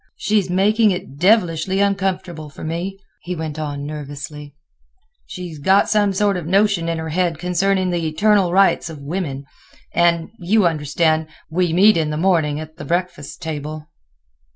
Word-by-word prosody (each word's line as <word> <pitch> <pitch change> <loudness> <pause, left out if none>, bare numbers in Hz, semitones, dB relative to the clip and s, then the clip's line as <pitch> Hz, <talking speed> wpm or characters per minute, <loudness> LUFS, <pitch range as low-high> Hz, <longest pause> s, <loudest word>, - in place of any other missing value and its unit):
She's 205 -3 0
making 210 +4 +3
it 180 -7 -4
devilishly 185 -2 +2
uncomfortable 190 -5 -1
for 145 - -11
me," 170 +5 -4 0.2
he 180 +1 -4
went 155 -2 -5
on 145 -2 -4
nervously. 145 0 -7 0.7
"She's 175 -4 -7
got 190 +7 +3
some 205 -2 +3
sort 200 0 +1
of 170 -3 -5
notion 195 -2 +2
in 165 - -1
her 160 0 -4
head 170 0 0
concerning 185 +2 0
the 170 -2 -1
eternal 195 +3 +2
rights 195 -2 +3
of 160 - -8
women; 140 -2 -4 0.5
and—you 175 +4 +2
understand—we 160 +2 0
meet 200 +4 +6
in 155 -2 0
the 150 - -3
morning 160 -4 +1
at 155 +1 -9
the - - -7
breakfast 175 -4 -3
table." 155 0 -6
170 Hz, 150 wpm, -20 LUFS, 155-190 Hz, 0.7 s, meet